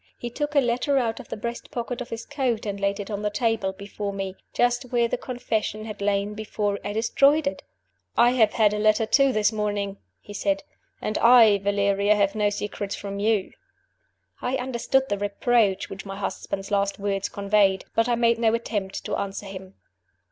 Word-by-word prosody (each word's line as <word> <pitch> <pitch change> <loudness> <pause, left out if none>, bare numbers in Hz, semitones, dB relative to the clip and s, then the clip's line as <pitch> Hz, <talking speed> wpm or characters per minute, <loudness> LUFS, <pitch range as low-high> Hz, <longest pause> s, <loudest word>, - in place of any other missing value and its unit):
He 240 - -6
took 295 +4 -3
a - - +7
letter 250 +3 +1
out 230 -2 0
of 260 - -11
the - - -4
breast 235 +2 -5
pocket 240 0 -4
of 245 - -6
his 230 0 -6
coat 260 -7 -1
and 200 -1 -3
laid 200 +1 0
it 205 +1 -6
on 205 0 -3
the 210 - 0
table 225 -2 0
before 200 +1 -5
me 195 -1 -4 0.2
just 245 +1 0
where 240 -1 +3
the - - -1
Confession 220 -4 -3
had 215 -2 -7
lain 200 0 0
before 210 -1 -2
I - - -3
destroyed 275 +7 +3
it! 280 - -2 0.6
"I 240 +1 +6
have 225 -4 +3
had 210 -2 +3
a 210 - -1
letter 215 +1 +3
too 275 +4 +4
this 215 -2 +2
morning," 205 -2 -2 0.2
he 205 - -11
said. 195 -1 -1 0.4
"And 215 - -1
I, 230 -4 +7
Valeria, 200 +1 +2
have 200 -1 +2
no 210 -1 +2
secrets 205 -1 -4
from 200 0 -6
you." 210 -2 +1 0.9
I 250 +1 -1
understood 260 +1 0
the 205 -4 -2
reproach 205 -1 +1
which 195 - -7
my 195 -1 -7
husband's 195 0 -4
last 200 0 +1
words 200 -1 -2
conveyed; 200 -1 +2
but 225 +2 +2
I 240 - +3
made 235 0 +2
no 225 -1 +3
attempt 205 -4 -4
to - - -2
answer 200 +1 -4
him. 190 -1 -9
210 Hz, 195 wpm, -25 LUFS, 200-235 Hz, 0.9 s, a